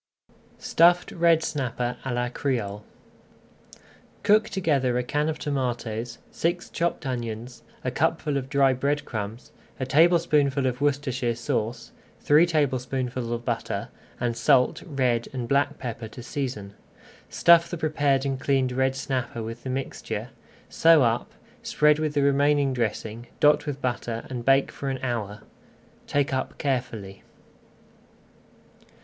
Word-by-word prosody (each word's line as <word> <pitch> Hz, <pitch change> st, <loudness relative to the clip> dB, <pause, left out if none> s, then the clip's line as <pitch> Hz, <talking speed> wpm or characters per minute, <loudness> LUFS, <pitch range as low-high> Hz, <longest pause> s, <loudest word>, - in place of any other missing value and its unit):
STUFFED 175 Hz, +2 st, +3 dB
RED 165 Hz, -1 st, +3 dB
SNAPPER 125 Hz, -4 st, -2 dB
À 135 Hz, -, -3 dB
LA 120 Hz, 0 st, -1 dB
CRÉOLE 115 Hz, -6 st, -2 dB, 1.4 s
Cook 215 Hz, +1 st, +4 dB
together 140 Hz, -10 st, +1 dB
a 125 Hz, -, 0 dB
can 150 Hz, +5 st, 0 dB
of 155 Hz, -, -3 dB
tomatoes, 120 Hz, -5 st, -3 dB
six 175 Hz, +1 st, -2 dB
chopped 170 Hz, -3 st, -1 dB
onions, 120 Hz, -1 st, -5 dB, 0.2 s
a 125 Hz, -, -1 dB
cupful 155 Hz, +1 st, 0 dB
of 135 Hz, -1 st, -3 dB
dry 135 Hz, -1 st, +4 dB
bread 140 Hz, +3 st, -1 dB
crumbs, 110 Hz, +1 st, -6 dB, 0.3 s
a 130 Hz, -, -1 dB
tablespoonful 150 Hz, -2 st, +3 dB
of 125 Hz, 0 st, -1 dB
Worcestershire 130 Hz, -4 st, 0 dB
Sauce, 115 Hz, 0 st, -3 dB, 0.3 s
three 155 Hz, +4 st, +5 dB
tablespoonfuls 130 Hz, -5 st, -1 dB
of 120 Hz, 0 st, -3 dB
butter, -, -, -3 dB, 0.3 s
and 120 Hz, -1 st, -1 dB
salt, 125 Hz, +2 st, +3 dB
red 125 Hz, -6 st, 0 dB
and 125 Hz, -3 st, -4 dB
black 140 Hz, +3 st, +1 dB
pepper 115 Hz, -2 st, -6 dB
to 120 Hz, +2 st, -10 dB
season. 125 Hz, -9 st, -4 dB, 0.6 s
Stuff 170 Hz, 0 st, +5 dB
the 175 Hz, -, -4 dB
prepared 145 Hz, -4 st, +1 dB
and 135 Hz, -1 st, -2 dB
cleaned 135 Hz, -2 st, +1 dB
red 130 Hz, +1 st, +1 dB
snapper 130 Hz, -3 st, -3 dB
with 115 Hz, +2 st, -7 dB
the 130 Hz, -, -6 dB
mixture, 130 Hz, +1 st, -4 dB, 0.4 s
sew 165 Hz, -3 st, +5 dB
up, 115 Hz, 0 st, 0 dB, 0.3 s
spread 150 Hz, 0 st, +3 dB
with 155 Hz, -1 st, -2 dB
the 145 Hz, -, +3 dB
remaining 140 Hz, 0 st, +3 dB
dressing, 115 Hz, -1 st, -3 dB
dot 150 Hz, 0 st, +4 dB
with 140 Hz, -1 st, -4 dB
butter, 120 Hz, -2 st, -2 dB
and 120 Hz, -2 st, -5 dB
bake 135 Hz, 0 st, +4 dB
for 140 Hz, -, -5 dB
an 135 Hz, -, -2 dB
hour. 110 Hz, -5 st, -3 dB, 0.6 s
Take 145 Hz, -1 st, 0 dB
up 130 Hz, -, -3 dB
carefully. 115 Hz, -8 st, -3 dB
130 Hz, 135 wpm, -25 LUFS, 120-145 Hz, 1.4 s, three